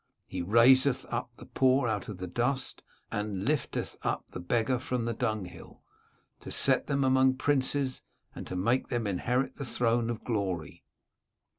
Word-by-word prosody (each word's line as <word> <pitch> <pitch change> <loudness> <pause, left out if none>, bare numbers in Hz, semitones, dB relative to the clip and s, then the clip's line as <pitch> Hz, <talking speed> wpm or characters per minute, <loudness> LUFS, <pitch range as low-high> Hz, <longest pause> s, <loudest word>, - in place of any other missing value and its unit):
He 90 - -4
raiseth 125 +7 +5
up - - -2
the - - -11
poor 130 -1 +2
out 105 -3 -2
of 105 - -6
the 90 - -5
dust, 120 +8 -1 0.3
and 105 -2 -3
lifteth 150 -2 -1
up - - -2
the - - -6
beggar 115 +7 0
from 125 -2 -2
the 115 - -1
dunghill, 105 -8 -4 0.6
to - - -9
set - - +3
them 140 0 +1
among 130 0 +4
princes, 135 -1 0 0.3
and - - -8
to 90 - -5
make 115 +8 +1
them 120 -2 -2
inherit 125 +7 -1
the 140 - -4
throne 120 -1 +1
of 115 -1 -4
glory." 95 - -3
120 Hz, 160 wpm, -29 LUFS, 105-130 Hz, 0.6 s, raiseth